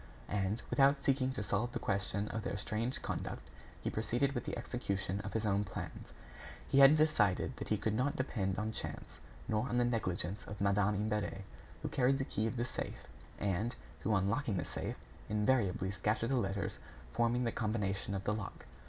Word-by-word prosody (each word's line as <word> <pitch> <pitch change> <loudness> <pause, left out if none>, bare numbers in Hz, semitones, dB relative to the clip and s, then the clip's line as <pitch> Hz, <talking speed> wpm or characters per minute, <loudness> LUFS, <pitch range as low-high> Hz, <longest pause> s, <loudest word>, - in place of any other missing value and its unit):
And, 100 +2 0
without 140 0 +4
seeking 130 -1 +3
to 105 - -3
solve 105 +5 0
the - - 0
question 100 +1 0
of 110 - -2
their 105 -3 -2
strange 110 +5 -2
conduct, - - -4 0.4
he - - 0
proceeded 120 +5 +1
with 120 - -2
the - - -3
execution 100 -5 -2
of - - -6
his 110 -1 0
own 100 0 +2
plans. 105 - -6 0.6
He 135 - +4
had 140 +3 +9
decided 135 - +3
that - - -5
he 105 - +2
could 105 +1 0
not 130 +6 +1
depend 100 -7 -1
on 110 +1 -1
chance, - - -6 0.3
nor 110 +4 +1
on 120 - +1
the 120 - +4
negligence 100 -4 -1
of 105 - -6
Madame 100 +1 +3
Imbert, 105 -1 -1 0.4
who - - 0
carried 135 +1 +3
the 135 - -1
key 110 -3 0
of 120 - -3
the 120 - +1
safe, - - -5 0.3
and 105 +4 0 0.2
who, - - -1
on 95 -1 +2
locking 115 -1 0
the 85 - -1
safe, - - -4 0.3
invariably 105 -3 +2
scattered 110 +4 0
the - - +3
letters 100 -4 -1 0.3
forming 120 +1 +2
the 115 - +1
combination 105 -3 -1
of 95 - -3
the 105 - +1
lock. 105 -2 -5
110 Hz, 190 wpm, -35 LUFS, 100-120 Hz, 0.6 s, had